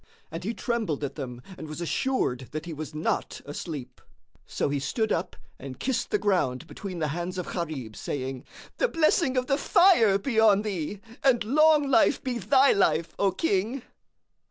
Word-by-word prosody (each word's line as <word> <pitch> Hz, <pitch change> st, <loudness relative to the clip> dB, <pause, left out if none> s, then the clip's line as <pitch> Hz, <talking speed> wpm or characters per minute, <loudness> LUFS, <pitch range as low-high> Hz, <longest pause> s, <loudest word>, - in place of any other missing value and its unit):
And 165 Hz, +2 st, -6 dB
he 225 Hz, +5 st, -3 dB
trembled 220 Hz, -, -2 dB
at 140 Hz, -, -3 dB
them 125 Hz, -4 st, -7 dB, 0.2 s
and -, -, -7 dB
was 155 Hz, -, -6 dB
assured 170 Hz, -, -1 dB
that 155 Hz, +1 st, -4 dB
he 170 Hz, -, -6 dB
was 155 Hz, 0 st, -7 dB
not 155 Hz, -, -2 dB
asleep; 145 Hz, -4 st, -7 dB, 0.5 s
so -, -, -1 dB
he 140 Hz, 0 st, -1 dB
stood 215 Hz, -, -1 dB
up -, -, -1 dB, 0.2 s
and 135 Hz, -2 st, -8 dB
kissed 265 Hz, -2 st, -1 dB
the -, -, +2 dB
ground 165 Hz, -10 st, 0 dB
between 185 Hz, +1 st, -7 dB
the 155 Hz, -2 st, -1 dB
hands 175 Hz, +4 st, -4 dB
of 180 Hz, -, -4 dB
Gharib, 150 Hz, -, -4 dB
saying, 130 Hz, -2 st, -4 dB, 0.3 s
"The -, -, +2 dB
blessing 310 Hz, -, +2 dB
of 250 Hz, -, +1 dB
the 275 Hz, +2 st, +1 dB
Fire 285 Hz, -, +5 dB
be 220 Hz, +3 st, -1 dB
on 210 Hz, -2 st, +5 dB
thee, 195 Hz, -1 st, -4 dB, 0.2 s
and 260 Hz, -5 st, +4 dB
long 300 Hz, +5 st, +4 dB
life 275 Hz, -, +3 dB
be 250 Hz, -3 st, -2 dB
thy 265 Hz, +7 st, +4 dB
life, 165 Hz, -4 st, +1 dB
O 200 Hz, -, +3 dB
King!" 225 Hz, -, -1 dB
190 Hz, 180 wpm, -27 LUFS, 150-250 Hz, 0.5 s, Fire